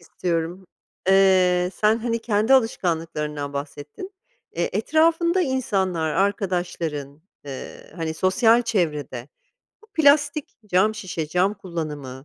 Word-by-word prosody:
istiyorum. 170 +1 -3 0.4
Eee, 185 -2 +4
sen, 215 +2 +2
hani, 230 0 -1
kendi 220 +3 +2
alışkanlıklarından 160 - -1
bahsettin. 145 - -7 0.4
Eee, 170 +1 -1
etrafında 325 - +2
insanlar, 190 - -1
arkadaşların, 175 -6 -2 0.2
eee, 140 +1 -9
hani, 160 -2 -3
sosyal 225 +7 +3
çevrede 150 - -2 0.5
bu - - -19
plastik, 290 -1 +3
cam 205 +3 +2
şişe, 180 -7 -4
cam 185 +5 +1
kullanımı, 150 -8 -6
185 Hz, 105 wpm, -23 LUFS, 160-225 Hz, 0.5 s, Eee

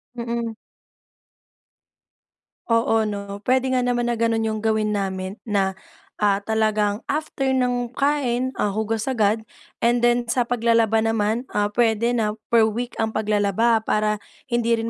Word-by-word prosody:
Mm. 235 -1 -3 2.1
Oo 230 -1 +3
'no, 200 -1 -5
puwede 260 0 +2
nga 255 -1 +1
naman 240 -1 0
na 240 - -1
gano'n 230 0 +1
yung 215 - -2
gawin 215 0 0
namin 195 -1 -3
na, 195 -3 0 0.4
ah, 200 -1 +2
talagang 215 -1 +1
after 295 -2 -2
ng 245 -2 0
kain, 260 -3 +1
ah, 205 - 0
hugas 220 +1 -1
agad 220 -4 +1 0.4
and 240 0 +3
then 240 0 +3
sa 235 +2 +1
paglalaba 230 -2 +2
naman, 225 +2 0
ah, 205 0 +1
puwede 230 +1 +2
na 210 -2 0 0.2
per 230 -2 +5
week 235 +3 -3
ang 220 0 -1
paglalaba 215 +1 +1
para 215 0 +1 0.3
hindi 235 -1 +1
rin 225 0 -1
225 Hz, 140 wpm, -23 LUFS, 210-240 Hz, 2.1 s, per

